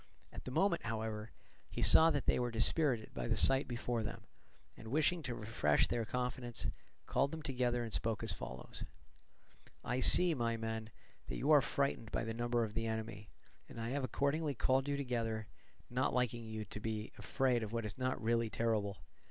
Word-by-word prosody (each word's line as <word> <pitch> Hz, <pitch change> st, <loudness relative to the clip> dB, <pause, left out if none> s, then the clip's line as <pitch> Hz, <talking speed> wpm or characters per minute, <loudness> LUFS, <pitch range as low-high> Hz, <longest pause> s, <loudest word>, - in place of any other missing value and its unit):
At -, -, -9 dB
the -, -, -5 dB
moment, 170 Hz, +6 st, +1 dB
however, 110 Hz, -1 st, -4 dB, 0.4 s
he -, -, -3 dB
saw 160 Hz, +1 st, +7 dB
that 145 Hz, -4 st, -1 dB
they -, -, +2 dB
were 120 Hz, 0 st, -1 dB
dispirited 120 Hz, +1 st, +4 dB
by -, -, -4 dB
the -, -, 0 dB
sight 135 Hz, +1 st, +4 dB
before 120 Hz, -1 st, -2 dB
them, 110 Hz, 0 st, -6 dB, 0.5 s
and 110 Hz, -, -12 dB
wishing 155 Hz, +7 st, +1 dB
to 125 Hz, -5 st, -4 dB
refresh 115 Hz, +1 st, +1 dB
their 120 Hz, -2 st, -2 dB
confidence, 125 Hz, 0 st, -3 dB, 0.3 s
called 140 Hz, -, +1 dB
them 160 Hz, +1 st, -7 dB
together 125 Hz, -3 st, -1 dB
and 115 Hz, -2 st, -6 dB
spoke 115 Hz, -2 st, 0 dB
as -, -, +3 dB
follows: 65 Hz, +1 st, -7 dB, 1.0 s
"I 125 Hz, +1 st, -1 dB
see, 175 Hz, +6 st, +8 dB
my 115 Hz, -4 st, -1 dB
men, 110 Hz, -1 st, -4 dB, 0.4 s
that -, -, -4 dB
you 145 Hz, -, 0 dB
are 150 Hz, -2 st, +7 dB
frightened 120 Hz, -3 st, -2 dB
by -, -, -1 dB
the 115 Hz, 0 st, -4 dB
number 120 Hz, 0 st, 0 dB
of 105 Hz, -2 st, -4 dB
the 115 Hz, +1 st, -2 dB
enemy, 110 Hz, -2 st, -5 dB, 0.4 s
and -, -, -9 dB
I 115 Hz, 0 st, -3 dB
have 140 Hz, +2 st, -2 dB
accordingly 140 Hz, +3 st, -1 dB
called 130 Hz, +3 st, +1 dB
you 140 Hz, -, 0 dB
together, 115 Hz, -5 st, -2 dB, 0.4 s
not 125 Hz, +1 st, -1 dB
liking 120 Hz, -2 st, -1 dB
you 110 Hz, -1 st, -5 dB
to 105 Hz, -, -8 dB
be 110 Hz, 0 st, -4 dB
afraid 130 Hz, -3 st, 0 dB
of 110 Hz, -1 st, -5 dB
what 115 Hz, -1 st, -3 dB
is 105 Hz, -2 st, -4 dB
not 130 Hz, 0 st, -1 dB
really 115 Hz, 0 st, 0 dB
terrible. 110 Hz, -3 st, -1 dB
120 Hz, 190 wpm, -35 LUFS, 110-130 Hz, 1.0 s, see